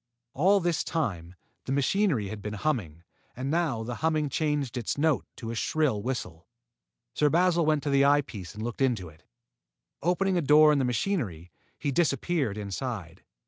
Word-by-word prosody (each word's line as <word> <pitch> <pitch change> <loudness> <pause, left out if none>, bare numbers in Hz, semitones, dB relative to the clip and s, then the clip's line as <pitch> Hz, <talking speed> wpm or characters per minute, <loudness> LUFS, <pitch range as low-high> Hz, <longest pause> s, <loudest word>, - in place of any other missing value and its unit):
All 190 +8 +4
this 175 -3 0
time, 95 - -3 0.3
the - - -4
machinery 140 - +1
had 105 0 -7
been 105 +1 -5
humming, 100 - -2 0.3
and 130 +3 -3
now 155 -9 0
the 120 +1 -5
humming 155 -2 +1
changed 145 -3 -1
its 120 +1 -2
note 155 -1 +1
to 115 -1 -6
a - - -5
shrill 135 -3 0
whistle. 100 -8 -5 0.7
Sir 150 - +3
Basil 170 0 +3
went 155 -2 +2
to 145 - -1
the 140 0 +4
eye 145 +1 +5
piece 100 - -9
and 110 - -6
looked 120 +3 -5
into 115 -10 +1
it. 80 0 -19 0.8
Opening 180 +4 +1
a - - +2
door 150 +1 +6
in 145 - +2
the 130 - +1
machinery, 115 - -2 0.3
he 145 - -2
disappeared 140 - 0
inside. 100 -3 -5
135 Hz, 175 wpm, -28 LUFS, 105-155 Hz, 0.8 s, door